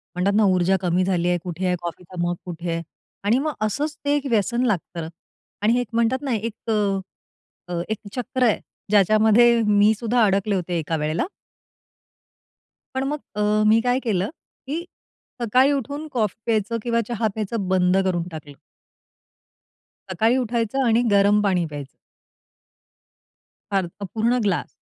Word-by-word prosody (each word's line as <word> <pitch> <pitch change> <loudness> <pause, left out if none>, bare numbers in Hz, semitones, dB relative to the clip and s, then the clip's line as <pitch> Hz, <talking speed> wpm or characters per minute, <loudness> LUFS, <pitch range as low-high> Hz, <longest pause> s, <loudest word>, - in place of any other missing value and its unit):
म्हणतात 195 +3 +1
ना 220 - +5
ऊर्जा 185 +1 +2
कमी 180 0 +1
झाली 180 -2 0
आहे. 175 - +2
कुठे 180 +1 -4
आहे 180 - +2
कॉफीचा 175 +1 -7
मग? 175 0 0
कुठे 170 -1 -4
आहे?" 165 0 -2 0.4
आणि 225 +6 +3
मग 305 0 -1
असंच 295 +8 -2
ते 290 0 +3
एक 290 - -2
व्यसन 235 +2 +1
लागतं. 175 -5 -2 0.5
आणि 220 +3 +3
हे 245 - +2
एक 245 - -5
म्हणतात 235 +4 +1
ना, 270 -4 -1
एक 220 0 -2 0.2
अ, 200 -3 -1 0.6
एक 220 - -1 0.2
चक्र 255 +1 -1
आहे 225 -4 +3 0.3
ज्याच्यामध्ये 220 +3 +5
मी 210 +1 +5
सुद्धा 235 +1 +1
अडकले 200 0 +1
होते 175 -1 -2
एका 160 +1 -2
वेळेला. 155 +2 -1 1.7
पण 265 - 0
मग 300 +2 -2 0.2
अ, 210 0 +2
मी 220 +1 +6
काय 250 +1 +1
केलं 200 -5 0 0.4
की 325 +5 -3 0.6
सकाळी 255 +5 +4
उठून 285 +3 -3
कॉफी 215 -6 0
प्यायचं 225 0 0
किंवा 235 -1 +1
चहा 235 -2 0
प्यायचं 215 -2 -3
बंद 185 0 +3
करून 175 -2 0
टाकलं. 150 -2 -9 1.6
सकाळी 225 +7 +2
उठायचं 240 +1 0
आणि 230 0 +4
गरम 200 +1 +4
पाणी 185 -4 +1
प्यायचं. 145 -3 -8 1.8
फार 195 -2 +1
तर 200 +4 -8
पूर्ण 230 +5 0
ग्लास 195 -4 0
210 Hz, 150 wpm, -23 LUFS, 185-235 Hz, 1.8 s, मी